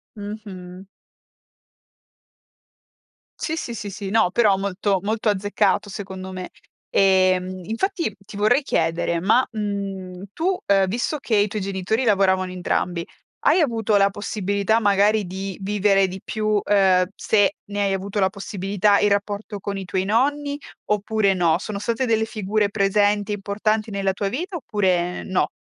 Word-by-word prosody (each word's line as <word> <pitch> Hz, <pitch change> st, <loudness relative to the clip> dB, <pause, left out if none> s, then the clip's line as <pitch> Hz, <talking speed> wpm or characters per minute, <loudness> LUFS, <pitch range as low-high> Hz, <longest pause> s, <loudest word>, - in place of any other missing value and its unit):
Mh-mh. 200 Hz, -3 st, -8 dB, 2.5 s
Sì, 320 Hz, -, -2 dB
sì, 240 Hz, -, -4 dB
sì, 210 Hz, -3 st, -5 dB
sì. 195 Hz, 0 st, -6 dB
No 220 Hz, -2 st, +3 dB
però 205 Hz, -2 st, +3 dB
molto 195 Hz, 0 st, 0 dB
molto 215 Hz, +2 st, 0 dB
azzeccato 205 Hz, 0 st, +1 dB
secondo 190 Hz, -1 st, -7 dB
me. 185 Hz, -1 st, -6 dB, 0.4 s
Ehm, 185 Hz, -1 st, +2 dB
infatti 325 Hz, -, -2 dB
ti 200 Hz, 0 st, -11 dB
vorrei 215 Hz, +7 st, +3 dB
chiedere 170 Hz, -, 0 dB
ma, 220 Hz, +8 st, +3 dB
mhmm, 195 Hz, -3 st, -4 dB
tu, 370 Hz, +4 st, 0 dB
ehm, 195 Hz, -1 st, +4 dB
visto 240 Hz, +9 st, -1 dB
che 240 Hz, -5 st, -1 dB
i 205 Hz, +1 st, +3 dB
tuoi 210 Hz, +1 st, -4 dB
genitori 195 Hz, +5 st, -1 dB
lavoravano 190 Hz, -3 st, +2 dB
entrambi, 180 Hz, -1 st, -1 dB, 0.4 s
hai -, -, +5 dB
avuto 225 Hz, -7 st, +1 dB
la 200 Hz, 0 st, +4 dB
possibilità 205 Hz, +1 st, 0 dB
magari 205 Hz, 0 st, +3 dB
di 190 Hz, +1 st, -5 dB
vivere 195 Hz, -1 st, +3 dB
di 185 Hz, +1 st, -7 dB
più, 215 Hz, -1 st, 0 dB
ehm, 190 Hz, -3 st, +4 dB
se 205 Hz, -3 st, +2 dB
ne 205 Hz, 0 st, -3 dB
hai 200 Hz, -1 st, +1 dB
avuto 195 Hz, +2 st, -3 dB
la 190 Hz, -1 st, +3 dB
possibilità, 200 Hz, 0 st, 0 dB
il 205 Hz, -, +3 dB
rapporto 205 Hz, +1 st, -2 dB
con 200 Hz, +1 st, -4 dB
i 195 Hz, -, -5 dB
tuoi 185 Hz, +1 st, -1 dB
nonni 285 Hz, +7 st, +1 dB, 0.3 s
oppure 210 Hz, -1 st, +1 dB
no? 170 Hz, -3 st, +2 dB
Sono 200 Hz, +2 st, -5 dB
state 235 Hz, +4 st, -1 dB
delle 220 Hz, -2 st, +2 dB
figure 210 Hz, -1 st, -1 dB
presenti 205 Hz, +1 st, +1 dB
e -, -, 0 dB
importanti 215 Hz, +2 st, -1 dB
nella 195 Hz, -2 st, -1 dB
tua 200 Hz, 0 st, -2 dB
vita 350 Hz, -, -4 dB
oppure 185 Hz, -, 0 dB
no? 185 Hz, -, 0 dB
200 Hz, 150 wpm, -22 LUFS, 190-215 Hz, 2.5 s, hai